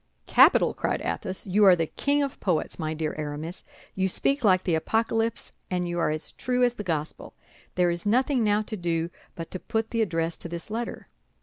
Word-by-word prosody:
"Capital!" - - +5
cried - - -1
Athos; 190 -3 -3
"you 200 +2 +2
are 190 -3 +8
the 165 -1 0
king 285 - 0
of 275 - -4
poets, 175 -3 -1
my 155 -1 -2
dear 155 -1 -2
Aramis. 155 +4 -5 0.3
You 190 0 0
speak 275 +8 0
like 185 -3 +4
the 175 - 0
Apocalypse, 225 +6 0 0.2
and 180 -1 -1
you 175 0 -2
are 165 - +2
as 155 +1 -2
true 250 0 0
as 245 -1 +3
the 210 - -6
Gospel. 160 -5 -4 0.4
There 180 -1 +3
is 170 0 -3
nothing 250 +4 +2
now 210 0 +2
to 215 - -6
do 170 -2 -1 0.2
but 165 -1 -7
to 185 - -4
put 220 +3 -2
the 230 - +1
address 165 -5 -1
to 170 - -5
this 170 +4 -7
letter." 235 +2 -4
185 Hz, 205 wpm, -26 LUFS, 165-225 Hz, 0.4 s, are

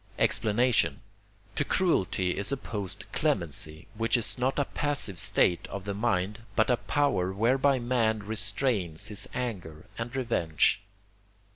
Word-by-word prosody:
Explanation 115 +2 +2 0.5
To - - +1
cruelty 95 - +1
is 100 +5 0
opposed 105 -6 -4
clemency, 85 - -1
which 115 +3 +1
is 115 - 0
not 130 +1 0
a 145 - +2
passive 140 -13 -2
state 85 -1 +3
of 100 - -6
the 100 - -2
mind, 100 -1 -1 0.2
but 110 +2 +3
a 120 - +3
power 115 -13 0
whereby 130 +7 +2
man 120 -3 0
restrains 105 - -1
his 105 - -2
anger 90 -11 -5
and 120 +2 -4
revenge. 100 -8 +1
110 Hz, 130 wpm, -28 LUFS, 95-125 Hz, 0.5 s, state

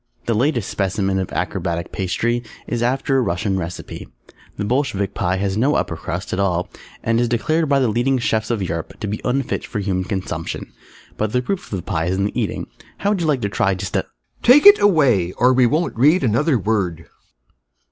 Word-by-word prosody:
The 115 - +1
latest 120 -1 +1
specimen 95 0 -1
of 95 - -3
Acrobatic 85 +1 -2
Pastry 120 +6 -1 0.2
is 120 -1 -3
after 135 +2 +1
a - - +3
Russian 95 -2 -1
recipe. 85 0 -6 0.5
The 105 - -2
Bolshevik 100 -6 0
Pie 90 +1 0
has 95 +1 -1
no 135 +6 +2
Upper - - -1
Crust - - -5
at - - -1
all 90 -3 0 0.3
and 115 +1 +2
is 120 - +2
declared 155 +7 +1
by 140 - +4
the 130 - +2
leading 120 +5 +1
Chefs 110 -3 0
of 115 -5 -1
Europe 85 -2 -5
to - - -2
be 105 +1 -3
unfit 130 +1 -1
for 115 - -6
human 95 -2 -1
consumption, 95 -4 -4 0.4
but 110 0 -1
the 125 - +2
proof 195 +8 -4
of 100 - -1
the 90 - -6
Pie 80 -5 -1
is 95 +1 0
in 100 - +1
the 105 - -1
eating, - - -3 0.3
how 200 - 0
would 200 -4 0
you 165 - 0
like 140 -5 +1
to 100 - -1
try 100 -1 +1
just 95 0 -5
a - - 0 0.3
Take 265 +7 +6
it 410 0 +10
away, 130 - +3
or 125 +2 +3
we 125 -1 +4
won't 160 +8 0
read 150 +9 +4
another 130 +5 +2
word! 95 -6 -1
110 Hz, 210 wpm, -20 LUFS, 95-130 Hz, 0.5 s, it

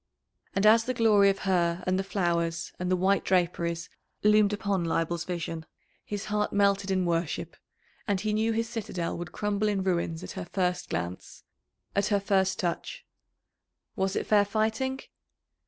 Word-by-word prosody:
And 195 +2 +2
as 225 +1 +6
the 255 - -2
glory 210 -3 +5
of 195 - +1
her 175 -2 +1
and 185 +1 +1
the - - 0
flowers 170 -3 -1
and 180 0 -2
the 185 - +3
white 190 +2 +2
draperies 170 -2 0 0.4
loomed 210 -1 +5
upon 200 -3 -1
Leibel's 165 +1 -1
vision 165 -2 -4 0.4
his 205 -1 -5
heart 210 0 0
melted 200 -1 +2
in 185 -1 +1
worship, 170 -2 -2 0.5
and 200 -2 +1
he 210 +2 -1
knew 220 +1 +1
his 230 +1 0
citadel 210 -7 -3
would 175 0 -6
crumble 210 0 -1
in 200 -2 0
ruins 170 -2 -1
at - - -7
her 190 -3 -6
first 180 -2 -1
glance, 90 +1 -5 0.5
at 200 0 +2
her 205 -2 +2
first 190 -1 +1
touch. 175 -2 -3 0.9
Was 190 0 0
it - - -1
fair 210 -1 +5
fighting? 220 +6 -1
195 Hz, 165 wpm, -28 LUFS, 175-210 Hz, 0.9 s, as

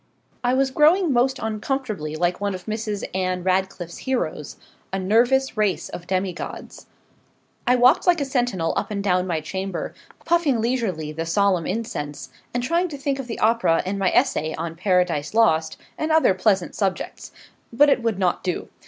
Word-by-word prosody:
I 245 +1 +2
was 265 0 +2
growing 315 +3 +4
most 260 +2 +2
uncomfortably 215 - -3
like 175 +3 0
one 200 -1 -1
of 185 - -9
Mrs. 215 -2 -3
Anne 185 -1 -1
Radcliffe's 185 -2 -1
heroes 200 - -3 0.3
a 190 - -1
nervous 240 +8 +2
race 210 -3 0
of 175 - -8
demigods. 185 -2 -4 0.8
I 250 - +5
walked 250 +7 +4
like 350 -2 +5
a 280 - 0
sentinel 245 - 0
up - - -1
and 200 -2 -3
down 185 -2 +1
my 165 -3 -1
chamber, 190 +5 -4 0.3
puffing 330 -8 +2
leisurely 220 -10 -1
the 165 +2 -4
solemn 185 -1 +2
incense, 165 -9 -4 0.2
and 245 0 -2
trying 340 +7 +1
to 300 -4 -7
think 275 0 -2
of 265 - -5
the 230 - -5
Opera 220 -7 +2
and 195 +2 -2
my 190 -2 +2
essay 160 - +1
on 165 0 -5
'Paradise 180 -2 0
Lost,' 160 -9 +3 0.2
and 310 +1 -1
other 315 -11 +5
pleasant 190 -1 +1
subjects. 195 -3 -3 0.4
But 280 +5 +5
it 265 - +2
would 230 -4 0
not 185 -2 0
do. 180 -2 -3
205 Hz, 170 wpm, -23 LUFS, 180-250 Hz, 0.8 s, I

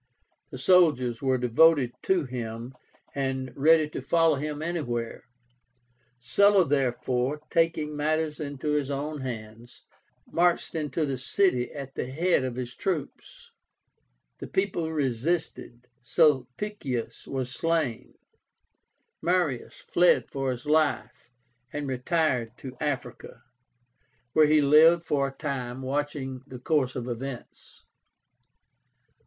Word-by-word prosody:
The - - -8
soldiers 145 -10 +3
were 130 -2 +2
devoted 125 +2 +4
to 185 -5 +2
him, 120 -1 -6 0.4
and 130 -2 -3
ready 155 +2 +4
to 150 - -6
follow 165 +4 +3
him 150 +1 -4
anywhere. 120 -9 -3 0.9
Sulla, 195 - +4
therefore, 130 0 0
taking 165 -3 +1
matters 155 +1 -1
into 145 0 -3
his 145 -2 0
own 145 +1 -3
hands, 115 -1 -8 0.4
marched 175 +1 +1
into 155 -1 -1
the 135 -3 -3
city 130 -3 +1
at 140 -2 -8
the - - -4
head 160 +3 +1
of 130 -2 -3
his 125 -1 -5
troops. 175 -7 -5 0.9
The - - -6
people 180 -4 -1
resisted; 135 -2 -2 0.2
Sulpicius 130 - 0
was 130 -2 -3
slain; 160 -7 -1 1.1
Marius 170 -7 -1
fled 175 0 +3
for 135 -1 -2
his 125 +2 -4
life, 150 -4 0 0.4
and 150 -1 -4
retired 125 -3 0
to 130 -1 -9
Africa, 145 -4 -4 0.9
where 155 -1 +5
he 150 0 +4
lived 160 +4 +6
for 140 -4 0
a - - -6
time, 130 -4 -4
watching 135 -1 -3
the 130 - -8
course 130 0 0
of 125 -1 -4
events. 125 +1 -8
140 Hz, 115 wpm, -27 LUFS, 125-160 Hz, 1.1 s, lived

